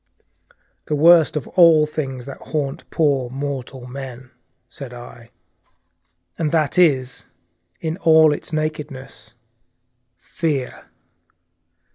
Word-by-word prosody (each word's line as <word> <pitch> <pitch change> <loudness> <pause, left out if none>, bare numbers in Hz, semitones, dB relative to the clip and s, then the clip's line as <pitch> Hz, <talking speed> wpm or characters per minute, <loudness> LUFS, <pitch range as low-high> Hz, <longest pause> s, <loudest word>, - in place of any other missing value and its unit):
"The 150 - 0
worst 165 +1 +5
of 145 - -5
all 165 -4 +6
the 150 - -13
things 135 -5 -4
that 140 - -9
haunt 150 0 -4
poor 140 -6 +1
mortal 135 -1 -5
men," 130 -1 -9 0.4
said 130 -3 -10
I; 120 -1 -12 1.1
"and 155 -3 0
that 160 +1 +1
is, 135 -7 +2 0.6
in 160 +1 -3
all 160 -4 +5
its 150 - -8
nakedness 150 -7 -5 0.8
'Fear! 145 -6 -4
145 Hz, 105 wpm, -20 LUFS, 130-155 Hz, 1.1 s, all